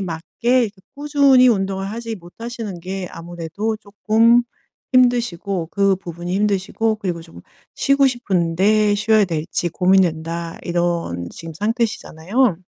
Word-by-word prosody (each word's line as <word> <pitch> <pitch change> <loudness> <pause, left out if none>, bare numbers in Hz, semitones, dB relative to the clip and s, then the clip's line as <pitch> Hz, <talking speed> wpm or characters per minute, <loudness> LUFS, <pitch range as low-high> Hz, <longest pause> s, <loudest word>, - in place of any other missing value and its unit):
맞게 165 -4 -4 0.4
이렇게 215 -3 -3 0.2
꾸준히 280 -3 +4
운동을 195 -3 0
하지 230 +1 -5
못하시는 210 +1 -8
게 185 +1 -5
아무래도 175 +6 -4
쪼끔 220 +3 +3 0.5
힘드시고 230 -8 +1
그 195 0 +2
부분이 175 -1 -6
힘드시고 210 +2 0
그리고 180 -5 -3
좀 165 0 -14 0.3
"쉬고 275 0 +3
싶은데 205 -2 +2
쉬어야 215 0 +3
될지 165 +1 -2
고민된다." 170 -2 +1
이런 170 - -2
지금 165 -1 -9
상태시잖아요. 215 - 0
195 Hz, 300 characters per minute, -20 LUFS, 170-225 Hz, 0.5 s, 꾸준히